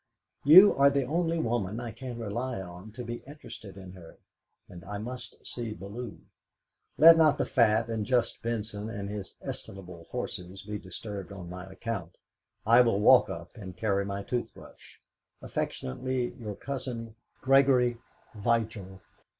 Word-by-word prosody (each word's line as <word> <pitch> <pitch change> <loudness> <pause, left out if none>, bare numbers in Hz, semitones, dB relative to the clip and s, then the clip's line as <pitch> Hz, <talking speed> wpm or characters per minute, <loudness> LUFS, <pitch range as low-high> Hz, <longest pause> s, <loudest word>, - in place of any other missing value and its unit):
You 185 +8 +9
are 140 +1 +7
the 140 -1 +1
only 165 +4 0
woman 115 - -1
I 120 -2 -5
can 125 +1 -7
rely 120 +2 -3
on 90 +3 -9
to 125 - -6
be 120 0 -5
interested 110 -9 -10
in 95 -1 -10
her, 90 -3 -13 0.5
and 85 -1 -11
I 100 +1 -5
must 125 +4 -8
see 115 -3 -5
Bellew. 100 +5 -7 0.8
Let 165 +1 +9
not 155 -3 +5
the - - 0
fat 115 -2 +3
and 110 -2 -2
just 120 0 0
Benson 110 -2 -3
and 100 -2 -5
his 100 -3 -6
estimable 90 -3 -8
horses 90 +2 -6
be 105 0 -5
disturbed 100 +1 -7
on 90 -3 -8
my 90 0 -7
account; 95 -4 -5 0.5
I 115 +3 +7
will 115 -5 +2
walk 105 - +6
up - - -7
and 95 -4 -9
carry 100 -1 +1
my 100 0 -4
toothbrush. 120 0 -6 0.4
"Affectionately 125 - -3
your 110 -5 -7
cousin, 125 -4 -5 0.3
"GREGORY 130 -3 +4 0.3
VIGIL." 105 -3 -1
110 Hz, 150 wpm, -29 LUFS, 100-125 Hz, 0.8 s, You